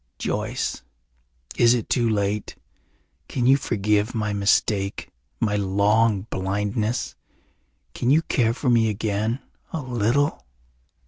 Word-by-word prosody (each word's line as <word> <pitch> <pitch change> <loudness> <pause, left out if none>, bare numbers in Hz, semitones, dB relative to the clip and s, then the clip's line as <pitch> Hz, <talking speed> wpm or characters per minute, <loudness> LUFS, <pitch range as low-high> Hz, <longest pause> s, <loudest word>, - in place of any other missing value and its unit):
"Joyce, - - -2 0.8
is 120 +1 +5
it 120 - -3
too 120 -3 +1
late? 105 -1 -1 0.7
Can 125 -3 -2
you 135 +2 +6
forgive 105 -2 0
my 105 -2 -1
mistake, 100 0 0 0.3
my 105 -3 +1
long 100 +2 +2
blindness? 105 +5 -2 0.8
Can 120 - -1
you 155 +4 +4
care 115 -6 +1
for 125 -1 0
me 115 -2 +4
again 110 +3 -2 0.3
a 160 - -3
little?" 130 +2 0
110 Hz, 115 wpm, -23 LUFS, 100-120 Hz, 0.8 s, you